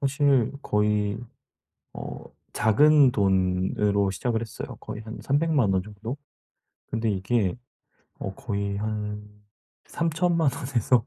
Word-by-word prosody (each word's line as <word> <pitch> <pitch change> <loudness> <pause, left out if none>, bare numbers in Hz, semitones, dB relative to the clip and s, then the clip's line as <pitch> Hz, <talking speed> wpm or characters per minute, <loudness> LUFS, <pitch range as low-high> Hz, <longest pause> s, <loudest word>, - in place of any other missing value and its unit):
사실 140 -3 +2
거의 105 0 +1 0.8
어 - - -7 0.3
작은 145 +5 +5
돈으로 95 0 +1
시작을 110 +4 -1
했어요 115 - -7
거의 110 0 -7
한 110 +1 -8
3,000,000 145 -6 +2
원 95 - +2
정도. 105 +6 -6 0.7
근데 115 -1 0
이게 100 0 0 0.6
어 95 - -5
거의 100 -2 -3
한 105 0 -3 0.6
30,000,000 165 -1 +1
원에서 125 -3 +1
110 Hz, 180 characters per minute, -26 LUFS, 100-135 Hz, 0.8 s, 작은